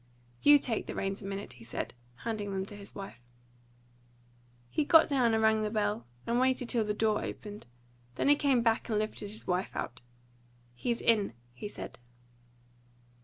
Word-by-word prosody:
"You 290 Hz, 0 st, +8 dB
take 240 Hz, -5 st, 0 dB
the -, -, -5 dB
reins 195 Hz, 0 st, -2 dB
a -, -, -8 dB
minute," 195 Hz, +1 st, -5 dB
he 120 Hz, -, -14 dB
said, 120 Hz, -, -4 dB, 0.3 s
handing 215 Hz, -3 st, -2 dB
them 190 Hz, -1 st, -2 dB
to 205 Hz, -, -10 dB
his 200 Hz, -1 st, -11 dB
wife. 195 Hz, -11 st, -8 dB, 1.5 s
He 300 Hz, -, 0 dB
got 320 Hz, +2 st, +7 dB
down 250 Hz, -6 st, +3 dB
and 220 Hz, -, +2 dB
rang 220 Hz, 0 st, +4 dB
the 215 Hz, -, 0 dB
bell, 210 Hz, -, -1 dB, 0.2 s
and 235 Hz, +1 st, +1 dB
waited 255 Hz, -1 st, +2 dB
till 235 Hz, -3 st, +2 dB
the 210 Hz, 0 st, -1 dB
door 215 Hz, -1 st, +1 dB
opened; 210 Hz, -, -7 dB, 0.5 s
then -, -, 0 dB
he 290 Hz, -, +7 dB
came 270 Hz, -5 st, +2 dB
back 230 Hz, +1 st, +1 dB
and 215 Hz, -, +1 dB
lifted 210 Hz, -1 st, -2 dB
his 215 Hz, +1 st, -6 dB
wife 180 Hz, +1 st, -1 dB
out. 125 Hz, +1 st, -4 dB, 0.7 s
"He's 235 Hz, -, -2 dB
in," 210 Hz, -, +3 dB, 0.2 s
he 125 Hz, -, -6 dB
said. 205 Hz, -, -8 dB
215 Hz, 175 wpm, -31 LUFS, 200-235 Hz, 1.5 s, You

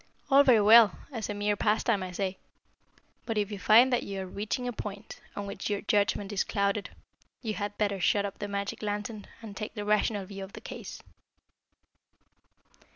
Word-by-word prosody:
All 275 Hz, +1 st, +8 dB
very 245 Hz, -6 st, +5 dB
well, 215 Hz, -1 st, +7 dB, 0.2 s
as 225 Hz, -5 st, -4 dB
a -, -, -1 dB
mere 205 Hz, 0 st, 0 dB
pastime, 210 Hz, 0 st, +1 dB
I 185 Hz, -1 st, -5 dB
say. 190 Hz, +1 st, -3 dB, 0.9 s
But 225 Hz, -2 st, -2 dB
if 205 Hz, 0 st, 0 dB
you 205 Hz, -, -5 dB
find 235 Hz, +6 st, +6 dB
that 245 Hz, -, +2 dB
you 195 Hz, -1 st, -5 dB
are -, -, -4 dB
reaching 215 Hz, +7 st, -3 dB
a 245 Hz, -, -2 dB
point 205 Hz, -1 st, -7 dB
on 205 Hz, -, -4 dB
which 200 Hz, 0 st, -5 dB
your 205 Hz, -1 st, -1 dB
judgment 205 Hz, -1 st, +1 dB
is 195 Hz, -, +1 dB
clouded, 200 Hz, 0 st, -1 dB, 0.5 s
you 220 Hz, -2 st, -2 dB
had 205 Hz, 0 st, -4 dB
better 200 Hz, -2 st, 0 dB
shut 200 Hz, +3 st, +2 dB
up 200 Hz, -, -6 dB
the 205 Hz, -, -3 dB
magic 200 Hz, 0 st, -4 dB
lantern 210 Hz, 0 st, -4 dB, 0.2 s
and 210 Hz, -3 st, -8 dB
take 210 Hz, +3 st, -6 dB
the 210 Hz, -1 st, -4 dB
rational 210 Hz, -1 st, +1 dB
view 195 Hz, 0 st, -8 dB
of 195 Hz, -, -10 dB
the -, -, -8 dB
case." -, -, -8 dB
205 Hz, 190 wpm, -29 LUFS, 200-215 Hz, 0.9 s, All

